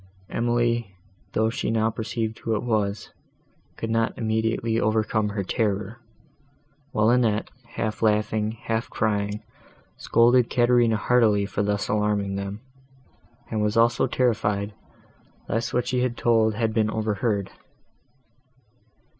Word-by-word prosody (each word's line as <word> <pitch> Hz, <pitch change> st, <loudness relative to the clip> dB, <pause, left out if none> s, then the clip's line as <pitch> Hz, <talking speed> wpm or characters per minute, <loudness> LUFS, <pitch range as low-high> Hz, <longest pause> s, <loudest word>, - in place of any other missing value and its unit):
Emily, 120 Hz, -3 st, 0 dB, 0.4 s
though 110 Hz, +1 st, +2 dB
she -, -, -2 dB
now 110 Hz, 0 st, +1 dB
perceived 110 Hz, 0 st, -3 dB
who 115 Hz, -, -1 dB
it 105 Hz, -, -2 dB
was, 105 Hz, -3 st, -1 dB, 0.7 s
could 115 Hz, -, -3 dB
not 115 Hz, 0 st, 0 dB
immediately 110 Hz, 0 st, 0 dB
overcome 110 Hz, -1 st, +1 dB
her 100 Hz, -1 st, -3 dB
terror; 105 Hz, +2 st, -2 dB, 0.9 s
while 110 Hz, 0 st, +3 dB
Annette, 115 Hz, -4 st, +1 dB, 0.2 s
half 110 Hz, -2 st, -3 dB
laughing, 105 Hz, 0 st, +1 dB
half 115 Hz, 0 st, -2 dB
crying, 105 Hz, -1 st, -1 dB, 0.5 s
scolded 120 Hz, +1 st, +4 dB
Caterina 120 Hz, -2 st, +3 dB
heartily 110 Hz, -3 st, +3 dB
for 100 Hz, +1 st, -2 dB
thus 105 Hz, 0 st, -1 dB
alarming 105 Hz, -1 st, 0 dB
them; 100 Hz, +2 st, -5 dB, 0.9 s
and 110 Hz, -2 st, 0 dB
was 105 Hz, +1 st, 0 dB
also 115 Hz, +1 st, +3 dB
terrified 105 Hz, -4 st, 0 dB, 0.7 s
lest 115 Hz, +3 st, -1 dB
what 125 Hz, -, 0 dB
she 125 Hz, -, 0 dB
had 125 Hz, -2 st, -1 dB
told 110 Hz, -2 st, +3 dB
had 110 Hz, -1 st, 0 dB
been 110 Hz, -1 st, +2 dB
overheard. 105 Hz, -2 st, -1 dB
110 Hz, 120 wpm, -25 LUFS, 105-115 Hz, 0.9 s, scolded